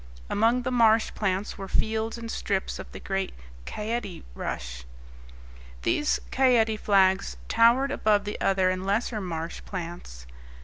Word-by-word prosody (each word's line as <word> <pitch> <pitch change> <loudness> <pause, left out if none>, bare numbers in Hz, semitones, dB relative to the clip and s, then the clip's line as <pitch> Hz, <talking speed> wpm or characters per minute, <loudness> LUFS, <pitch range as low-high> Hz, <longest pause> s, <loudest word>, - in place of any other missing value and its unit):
Among 230 +4 +3
the 255 - -1
marsh 225 -2 +4
plants 195 0 -2
were 195 - -5
fields 220 +3 -1
and 230 -1 -6
strips 195 -2 -2
of - - -9
the - - -8
great 195 0 -3 0.3
caete 210 - -4
rush. 60 0 -5 1.0
These 295 - +1
caete 235 -5 +3
flags 190 -1 +3
towered 235 +5 +4
above 210 -6 +2
the 210 - -5
other 190 -1 +3
and 185 0 -3
lesser 210 +2 0
marsh 165 -2 -4
plants. 170 - -7
205 Hz, 135 wpm, -27 LUFS, 185-230 Hz, 1.0 s, marsh